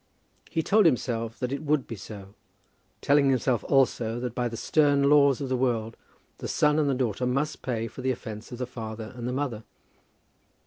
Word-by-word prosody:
He 160 - -1
told 210 +2 +5
himself 115 -5 -1
that 125 -1 -3
it 140 - -3
would 150 -2 +1
be 115 - -6
so, 100 -1 -10 0.7
telling 140 -1 +4
himself 130 -2 +1
also 120 -4 +2
that, 125 -2 -4
by 125 0 -1
the 115 -1 -6
stern 145 -1 +3
laws 140 -2 +5
of 140 - -2
the 130 - 0
world, 115 -3 0 0.4
the - - -5
son 150 +1 +2
and 145 -2 +2
the 135 - +1
daughter 125 -1 -1
must 140 +5 -1
pay 115 -4 -2
for 120 - -8
the 130 - 0
offence 110 -3 -5
of 120 - -6
the 125 - -2
father 110 -2 -7
and 120 -1 -5
the - - -1
mother. 125 -5 -3
125 Hz, 195 wpm, -27 LUFS, 115-140 Hz, 0.7 s, told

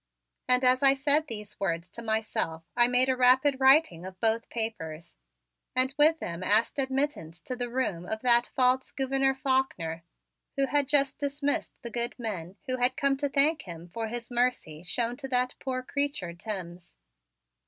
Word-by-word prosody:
And 250 +1 +3
as 255 0 +4
I 275 -1 +5
said 290 +3 +2
these 210 -4 -8
words 170 -3 -2
to 235 - -8
myself 220 -7 -2
I 240 0 +5
made 250 +1 +3
a 260 - +2
rapid 260 +2 +4
writing 265 - +4
of 185 0 -9
both 225 0 0
papers 170 -8 -5 0.6
and 260 +1 +2
with 310 +2 +5
them 170 - -5
asked 215 +8 +2
admittance 265 - -2
to 255 - -4
the 245 -1 -3
room 205 -9 -2
of 220 0 -4
that 240 -1 +4
false 255 0 +2
Gouverneur 270 0 0
Faulkner, 260 -12 -1 0.6
who 275 - +4
had 280 +1 0
just 280 -1 +2
dismissed 285 0 -2
the 235 - -5
good 235 +1 -3
men 195 -7 -5
who 255 -2 -1
had 250 +2 +1
come 275 -3 +2
to 285 +1 -1
thank 295 +3 +2
him 170 -1 -10
for 225 +5 -4
his 235 +2 -6
mercy 240 -11 -1
shown 235 +7 -1
to 270 -1 -6
that 250 -1 +1
poor 255 -1 -3
creature 280 -11 -2
Timms. 175 -2 -7
250 Hz, 175 wpm, -28 LUFS, 205-270 Hz, 0.6 s, I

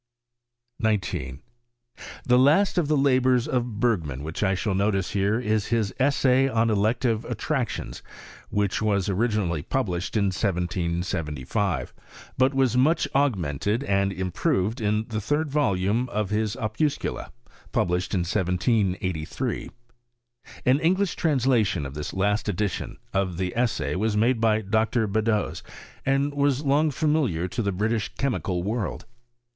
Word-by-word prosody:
19. 105 - -1 0.8
The 125 0 +4
last 160 +9 +4
of 160 - 0
the 150 0 +2
labours 130 -3 +3
of 125 -6 -2
Bergman 80 - 0
which 80 +2 -5
I 95 -2 +2
«hail 95 +2 -1
notice 95 -1 0
here 100 +3 +1
is 110 -3 0
his 115 -4 0
Essay 135 -1 +3
on 115 -2 +2
Elective 115 +2 +1
Attractions, 120 - -3 0.5
■which 100 0 0
was 100 -3 +1
originally 100 -6 0
published 95 - -2
in 100 -2 +2
1775, 85 - -2 0.4
but 130 +1 +3
was 130 -3 +2
much 150 +7 +3
augmented 105 - 0
and 100 -5 +1
improved 95 - -1
in 105 +1 0
the 110 -1 -2
third 145 +7 -1
Tolume 115 -3 +1
of 105 -1 -2
his 105 +1 0
Opuscula, 130 +5 -2 0.4
published 90 +2 0
in 90 - +1
1783. 95 +2 -1 1.0
An 130 +3 +4
English 185 +4 +1
translation 120 - +1
of 65 - -6
this 75 0 -5
last 105 +2 0
edition 100 0 -2 0.2
of 95 -3 0
the 90 -1 -2
Essay 120 -1 0
was 105 +2 0
made 115 +2 +2
by 110 -1 +3
Dr. 110 +3 +1
Beddoes, 105 +1 0 0.4
and 140 +1 +1
was 145 0 +1
long 145 +3 +3
familiar 140 - 0
to 120 - -2
the 100 -2 0
British 110 +3 -1
chemical 105 -9 -1
world. 105 0 -3
110 Hz, 130 wpm, -25 LUFS, 95-130 Hz, 1.0 s, The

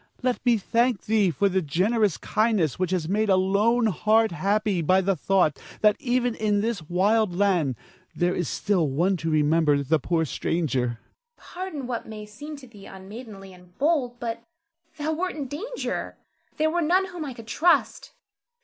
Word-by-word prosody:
Let 250 -1 0
me 240 -2 +4
thank 230 +1 +1
thee 210 -3 +2
for 200 +4 +1
the 190 -1 +1
generous 195 +6 +1
kindness 215 - 0
which 185 -2 0
has 180 -4 -1
made 210 +3 0
a 190 - +5
lone 205 +6 +2
heart 220 +1 +2
happy 200 +1 0
by 185 +4 +3
the 190 +1 +1
thought 180 -3 +1 0.2
that 210 -1 +5
even 245 -1 0
in 210 -2 0
this 225 -3 -2
wild 200 +2 +2
land 180 -9 +1 0.4
there 175 +1 +1
is 175 - -2
still 190 -7 0
one 170 +8 +1
to 165 0 -3
remember 150 -1 +2
the 155 +3 +2
poor 160 +3 0
stranger. 150 -4 -1
Zara. 120 -1 -5 0.4
Pardon 350 -7 -7
what 245 -2 -4
may 215 -1 -8
seem 290 +9 -9
to 275 -3 -13
thee 205 -4 -14
unmaidenly 195 0 -10
and 180 -1 -19
bold; 270 -5 0
but 230 -1 -4 0.6
thou 310 +1 -1
wert 365 +3 -2
in 285 -3 -4
danger; 420 - -5 0.4
there 315 +1 +2
were 345 +1 0
none 360 +4 +3
whom 350 -3 -6
I 270 -4 -6
could 230 - -11
trust. 340 - +1
210 Hz, 175 wpm, -25 LUFS, 180-245 Hz, 0.6 s, a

